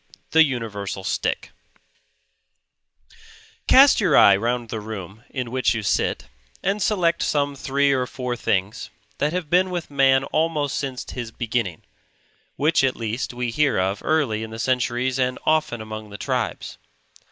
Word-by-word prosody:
THE 160 0 +7
UNIVERSAL 110 -8 -4
STICK - - -2 2.2
Cast 270 -2 +7
your 175 -9 +4
eye 100 - +8
round 120 +3 -2
the 110 - -4
room 105 0 -8
in 125 -4 -4
which 130 -3 +1
you 110 - -3
sit, - - 0 0.4
and 200 +2 0
select 175 -5 +1
some 145 -1 0
three 140 +1 +1
or 130 -2 0
four 125 -1 -4
things 100 -1 -2 0.3
that 150 - +1
have 180 -2 -3
been 185 +1 +4
with 175 -4 -5
man 135 -1 +4
almost 155 -1 -1
since 130 -3 -4
his 120 -3 -5
beginning; 115 -7 -3 0.7
which 150 -1 +2
at 130 -1 +2
least 115 +1 -3
we 125 -1 -2
hear 150 +3 +1
of 95 +2 -1
early 140 -9 +1
in 110 - -5
the 110 - -8
centuries 125 +1 0
and 125 0 0
often 155 -7 +1
among 110 -1 -7
the 100 - -8
tribes. - - -3
125 Hz, 150 wpm, -23 LUFS, 110-150 Hz, 2.2 s, eye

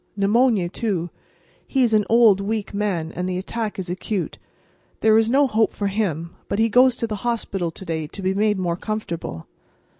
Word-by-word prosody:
Pneumonia, 210 -1 +3
too. 175 -3 -2 0.6
He 265 -2 +2
is 230 -2 +2
an 210 -1 +4
old, 225 -4 +5
weak 210 0 -3
man, 190 -6 -1
and 180 +2 -3
the 180 - -2
attack 215 +3 -4
is 190 -2 -4
acute. 185 +2 -3 0.6
There 220 -1 +5
is 225 0 +4
no 280 +4 +4
hope 220 -4 +1
for 200 -1 -2
him; 170 -5 -2
but - - -2
he 225 +1 +3
goes 250 +2 +5
to - - -1
the 215 -2 -4
hospital 200 -6 -2
to 175 +4 -10
day 160 -2 -3
to 195 - -8
be 190 +1 +1
made 210 +1 +1
more 175 -2 -1
comfortable." 170 - -5
205 Hz, 190 wpm, -22 LUFS, 180-225 Hz, 0.6 s, old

